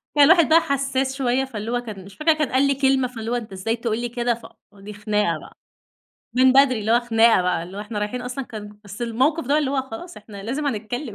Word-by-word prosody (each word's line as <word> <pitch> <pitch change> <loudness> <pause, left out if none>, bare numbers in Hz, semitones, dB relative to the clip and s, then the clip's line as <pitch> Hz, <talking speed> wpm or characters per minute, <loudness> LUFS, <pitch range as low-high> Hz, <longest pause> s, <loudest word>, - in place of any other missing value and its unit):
كان 290 - +7
الواحد 335 +1 +5
بقي 325 +1 +7
حساس 270 -1 -1
شوية 265 0 0
فاللي 225 -3 -6
هو 245 - 0
كان 205 -5 -9
مش 200 - -14
فاكرة 320 +1 +3
كان 305 -3 -1
قال 265 +2 +3
لي 275 - +1
كلمة، 265 -1 +2
فاللي 230 -2 -6
هو - - +1
أنت 225 -4 -5
إزاي 210 +5 -2
تقول 230 -1 -2
لي 240 0 -3
كده؟! 240 0 0
ف 235 - -11 0.3
دي 205 +1 -10
خناقة 210 -5 -1
بقى. - - -15 0.8
من 255 0 +6
بدري، 265 -4 +4
اللي 215 +2 -2
هو 240 - +4
خناقة 230 -4 +4
بقى 180 -2 0
اللي 180 +3 -10
هو 205 - -4
إحنا 210 0 -5
رايحين 210 +4 -3
أصلًا 250 +2 -5
كان 210 -3 -10
بس 205 +4 -8
الموقف 265 +8 0
ده 290 +2 +3
اللي 285 -3 0
هو 270 -1 0
خلاص 265 +8 -9
إحنا 205 -2 -11
لازم 270 +8 -3
هنتكلم، 245 0 -4
240 Hz, 250 wpm, -22 LUFS, 215-270 Hz, 0.8 s, كان